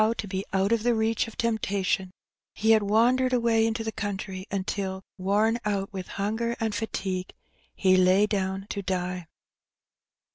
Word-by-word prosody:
to 205 Hz, -, -4 dB
be 190 Hz, 0 st, -3 dB
out 195 Hz, +2 st, +1 dB
of 230 Hz, -2 st, +3 dB
the 240 Hz, +1 st, +2 dB
reach 220 Hz, +1 st, +1 dB
of 225 Hz, -, -11 dB
temptation, 200 Hz, -4 st, 0 dB, 0.5 s
he 220 Hz, +1 st, +3 dB
had 220 Hz, -1 st, +6 dB
wandered 245 Hz, +5 st, +3 dB
away 230 Hz, -2 st, +3 dB
into 225 Hz, 0 st, -2 dB
the 220 Hz, -, -3 dB
country 195 Hz, -3 st, -5 dB
until, 190 Hz, -1 st, -3 dB, 0.2 s
worn 210 Hz, +5 st, +2 dB
out 200 Hz, -1 st, -2 dB
with 190 Hz, -2 st, -5 dB
hunger 220 Hz, +4 st, -1 dB
and 220 Hz, -1 st, -1 dB
fatigue, 190 Hz, -4 st, -3 dB, 0.4 s
he 185 Hz, -1 st, +4 dB
lay 185 Hz, +2 st, +5 dB
down 195 Hz, -2 st, -2 dB
to 200 Hz, -, -4 dB
die. 180 Hz, -2 st, -3 dB
205 Hz, 155 wpm, -27 LUFS, 190-225 Hz, 0.5 s, had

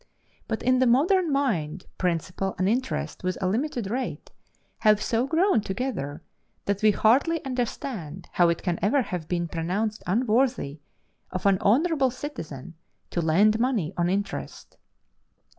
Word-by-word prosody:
But 220 Hz, -, -3 dB
in 255 Hz, +1 st, +3 dB
the 260 Hz, -, +4 dB
modern 320 Hz, +8 st, +3 dB
mind, 185 Hz, -, -1 dB
principal, 180 Hz, +2 st, -1 dB
and 185 Hz, -, +1 dB
interest 250 Hz, 0 st, -2 dB
within 185 Hz, +1 st, -2 dB
a -, -, +2 dB
limited 230 Hz, 0 st, -1 dB
rate, 255 Hz, +2 st, -4 dB, 0.5 s
have 215 Hz, -1 st, +4 dB
so 230 Hz, +4 st, 0 dB
grown 330 Hz, -, +3 dB
together, 195 Hz, -, -4 dB, 0.4 s
that 200 Hz, 0 st, -1 dB
we 215 Hz, -, +6 dB
hardly 270 Hz, -, +3 dB
understand 230 Hz, -, -4 dB
how 175 Hz, -1 st, +4 dB
it 170 Hz, -, -1 dB
can 175 Hz, -2 st, -1 dB
ever 235 Hz, +8 st, +3 dB
have 180 Hz, -6 st, -5 dB
been 175 Hz, -1 st, -1 dB
pronounced 195 Hz, +7 st, -2 dB
unworthy 225 Hz, -, +1 dB, 0.5 s
of 185 Hz, +1 st, -5 dB
an 195 Hz, -2 st, +4 dB
honorable 275 Hz, -, +3 dB
citizen 180 Hz, -, -7 dB, 0.4 s
to 175 Hz, -, 0 dB
lend 200 Hz, +7 st, +4 dB
money 230 Hz, -9 st, 0 dB
on 175 Hz, 0 st, +1 dB
interest. 185 Hz, -, -4 dB
210 Hz, 140 wpm, -26 LUFS, 180-255 Hz, 0.5 s, we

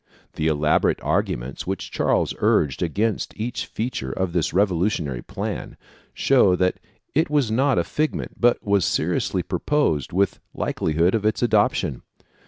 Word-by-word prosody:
The 80 Hz, -, -1 dB
elaborate 75 Hz, 0 st, +2 dB
arguments -, -, -2 dB
which 95 Hz, 0 st, -4 dB
Charles -, -, +1 dB
urged 70 Hz, -3 st, +2 dB
against 105 Hz, +7 st, -1 dB
each 115 Hz, +2 st, -3 dB
feature 110 Hz, -, -4 dB
of 95 Hz, +1 st, -2 dB
this 85 Hz, -3 st, 0 dB
revolutionary 90 Hz, -, 0 dB
plan -, -, -5 dB, 0.3 s
show 125 Hz, -9 st, +4 dB
that 90 Hz, 0 st, 0 dB, 0.3 s
it 160 Hz, +2 st, +2 dB
was 145 Hz, -7 st, +1 dB
not 135 Hz, +4 st, +2 dB
a -, -, +3 dB
figment 155 Hz, +1 st, -3 dB
but 120 Hz, 0 st, +3 dB
was 100 Hz, -2 st, +3 dB
seriously -, -, 0 dB
proposed 115 Hz, -, 0 dB
with 100 Hz, +3 st, +1 dB, 0.2 s
likelihood 80 Hz, +4 st, 0 dB
of 110 Hz, -2 st, 0 dB
its 110 Hz, +3 st, +1 dB
adoption. 105 Hz, -, +1 dB
95 Hz, 140 wpm, -23 LUFS, 80-115 Hz, 0.3 s, show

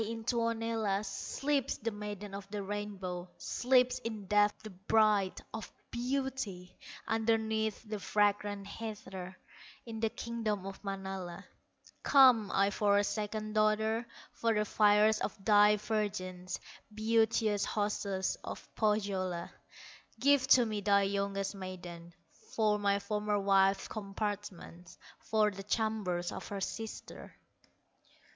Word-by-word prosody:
in 225 Hz, +1 st, -4 dB
Tuonela 225 Hz, -3 st, 0 dB
Sleeps 275 Hz, +6 st, -1 dB
the 230 Hz, +1 st, -3 dB
Maiden 205 Hz, -1 st, -6 dB
of 200 Hz, 0 st, -7 dB
the 205 Hz, -1 st, -4 dB
Rainbow, 190 Hz, -3 st, -5 dB
Sleeps 250 Hz, 0 st, +2 dB
in 220 Hz, -4 st, -5 dB
death 205 Hz, +1 st, +4 dB
the 215 Hz, -, -8 dB
Bride 200 Hz, 0 st, +2 dB
of 220 Hz, -1 st, -6 dB, 0.2 s
Beauty, 245 Hz, -7 st, -3 dB, 0.3 s
Underneath 220 Hz, 0 st, 0 dB
the 210 Hz, -1 st, -4 dB
fragrant 205 Hz, 0 st, +1 dB
heather, 195 Hz, -4 st, -7 dB, 0.5 s
In 225 Hz, -2 st, -6 dB
the 225 Hz, 0 st, +1 dB
kingdom 215 Hz, -4 st, -3 dB
of 195 Hz, +1 st, -8 dB
Manala. 190 Hz, -3 st, -5 dB, 0.6 s
Come 255 Hz, -7 st, +6 dB
I 200 Hz, +1 st, +3 dB
for 205 Hz, -1 st, +3 dB
a 205 Hz, -, +4 dB
second 215 Hz, +1 st, -3 dB
daughter, 220 Hz, +2 st, +2 dB, 0.2 s
For 230 Hz, -1 st, 0 dB
the 210 Hz, 0 st, +1 dB
fairest 210 Hz, +1 st, +4 dB
of 195 Hz, -, -4 dB
thy 210 Hz, -1 st, +6 dB
virgins. 195 Hz, -4 st, -3 dB, 0.3 s
Beauteous 220 Hz, -1 st, +2 dB
hostess 200 Hz, -2 st, -1 dB
of -, -, -7 dB
Pohyola, 195 Hz, -5 st, 0 dB, 0.7 s
Give 275 Hz, 0 st, +4 dB
to 250 Hz, -3 st, +7 dB
me 215 Hz, -2 st, -2 dB
thy 200 Hz, 0 st, +4 dB
youngest 195 Hz, 0 st, -1 dB
maiden, 180 Hz, -3 st, -8 dB, 0.4 s
For 210 Hz, -2 st, +2 dB
my 200 Hz, -1 st, +2 dB
former 210 Hz, +1 st, -1 dB
wife's 195 Hz, 0 st, +3 dB
compartments, 195 Hz, -4 st, -5 dB, 0.2 s
For 215 Hz, -1 st, +2 dB
the 195 Hz, 0 st, -8 dB
chambers 205 Hz, -4 st, -1 dB
of -, -, -7 dB
her 200 Hz, -, -4 dB
sister." 220 Hz, +3 st, -6 dB
210 Hz, 120 wpm, -32 LUFS, 195-220 Hz, 0.7 s, to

